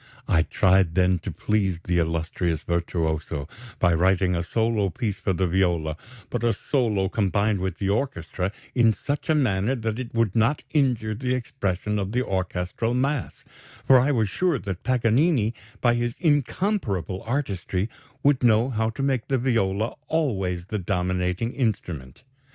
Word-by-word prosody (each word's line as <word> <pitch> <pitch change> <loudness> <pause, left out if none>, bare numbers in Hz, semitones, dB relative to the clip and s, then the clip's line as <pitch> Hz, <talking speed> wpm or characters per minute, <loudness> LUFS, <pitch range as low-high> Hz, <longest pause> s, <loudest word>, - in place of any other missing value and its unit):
"I 80 - +4
tried 95 0 +3
then 90 -1 +3
to - - -5
please 95 -5 0
the 90 0 0
illustrious 80 0 -1
virtuoso 80 -3 -2 0.3
by 90 -1 +3
writing 90 +2 +2
a 85 - 0
solo 110 +2 0
piece 110 -2 -3
for 95 - 0
the 95 +1 +1
viola, 85 -4 +1 0.4
but 120 -2 -2
a 115 -1 +3
solo 105 -4 0
combined 100 0 +1
with 95 -1 -3
the 100 - -1
orchestra 95 - -2 0.2
in 115 -3 +4
such 145 +8 -4
a 160 - +4
manner 120 -3 +1
that 115 -1 -3
it 125 -2 -5
would 115 -4 +1
not 115 +6 +2
injure 125 -7 +1
the 125 +3 -1
expression 105 -4 -2
of 100 +1 -3
the 125 +1 +1
orchestral 95 +5 -2
mass, 135 0 -1 0.4
for 130 -1 +7
I 130 +4 +2
was 115 -6 +2
sure 175 - +1
that 100 -6 -5
Paganini, 125 0 +2 0.3
by 120 -1 +4
his 120 0 -1
incomparable 145 - 0
artistry, 105 - -2 0.4
would 140 -2 +3
know 120 +2 +4
how 110 -1 0
to 115 +5 -4
make 135 -4 0
the 135 - +1
viola 115 -3 0
always 95 - -1
the 105 +2 -3
dominating 90 +3 -1
instrument.... 90 - -3
105 Hz, 155 wpm, -25 LUFS, 90-125 Hz, 0.4 s, for